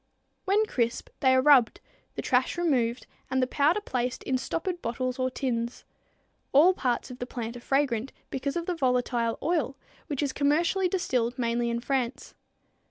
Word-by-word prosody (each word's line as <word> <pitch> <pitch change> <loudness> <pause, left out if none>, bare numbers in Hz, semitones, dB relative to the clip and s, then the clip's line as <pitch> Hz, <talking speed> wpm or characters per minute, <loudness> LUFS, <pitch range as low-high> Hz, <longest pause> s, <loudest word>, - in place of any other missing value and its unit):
When 410 +3 +3
crisp 235 - -1
they 260 -1 +4
are 260 - +3
rubbed, 265 -6 +5 0.4
the - - -4
trash - - +1
removed 255 -8 +1 0.2
and 260 0 +1
the 255 - +3
powder 295 +9 +2
placed 250 -8 -2
in 265 - 0
stoppered 345 +6 -3
bottles 250 +2 -3
or 255 0 +1
tins. 240 -3 -3 0.7
All 320 +7 +7
parts 255 -5 -1
of 250 - -10
the 245 - -4
plant 235 -2 -5
are - - -7
fragrant 265 -2 0 0.2
because 275 +1 -2
of 340 -1 -2
the 360 - -1
volatile 250 -5 0
oil, 310 -5 0 0.3
which 290 -3 -2
is 280 - -1
commercially 335 +6 +2
distilled 250 -10 -1
mainly 235 -1 0
in 235 0 -2
France. 260 -1 -2
260 Hz, 165 wpm, -27 LUFS, 240-295 Hz, 0.7 s, All